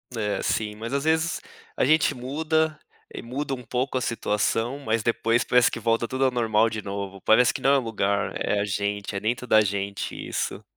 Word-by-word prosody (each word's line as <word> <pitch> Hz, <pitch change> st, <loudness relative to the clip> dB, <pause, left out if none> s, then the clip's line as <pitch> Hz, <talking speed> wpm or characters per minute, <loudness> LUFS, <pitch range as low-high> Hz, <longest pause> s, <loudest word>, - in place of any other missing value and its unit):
É, 105 Hz, -3 st, -1 dB
sim, 105 Hz, -1 st, -1 dB
mas 115 Hz, +4 st, -6 dB
às 140 Hz, 0 st, 0 dB
vezes 160 Hz, +2 st, +1 dB, 0.3 s
a -, -, +1 dB
gente 155 Hz, -1 st, +3 dB
muda 155 Hz, +4 st, -1 dB, 0.3 s
e -, -, -6 dB
muda 135 Hz, +4 st, -4 dB
um 130 Hz, -, -5 dB
pouco 125 Hz, +3 st, -1 dB
a -, -, -1 dB
situação, 115 Hz, +3 st, -1 dB
mas 115 Hz, -5 st, -1 dB
depois 115 Hz, 0 st, +1 dB
parece 125 Hz, -1 st, +4 dB
que -, -, -5 dB
volta 115 Hz, +1 st, +1 dB
tudo 130 Hz, +3 st, -1 dB
ao 130 Hz, -, +3 dB
normal 115 Hz, -2 st, +2 dB
de 110 Hz, -1 st, -4 dB
novo. 100 Hz, -1 st, -5 dB
Parece 120 Hz, +2 st, +4 dB
que -, -, -4 dB
não 135 Hz, -, +4 dB
é -, -, +5 dB
lugar, 105 Hz, -5 st, -1 dB
é 105 Hz, -, 0 dB
a -, -, 0 dB
gente, 100 Hz, 0 st, -2 dB
é -, -, -1 dB
dentro 120 Hz, +4 st, -2 dB
da 110 Hz, -3 st, +5 dB
gente, 100 Hz, -1 st, -3 dB
isso. -, -, -4 dB
115 Hz, 205 wpm, -25 LUFS, 105-130 Hz, 0.3 s, é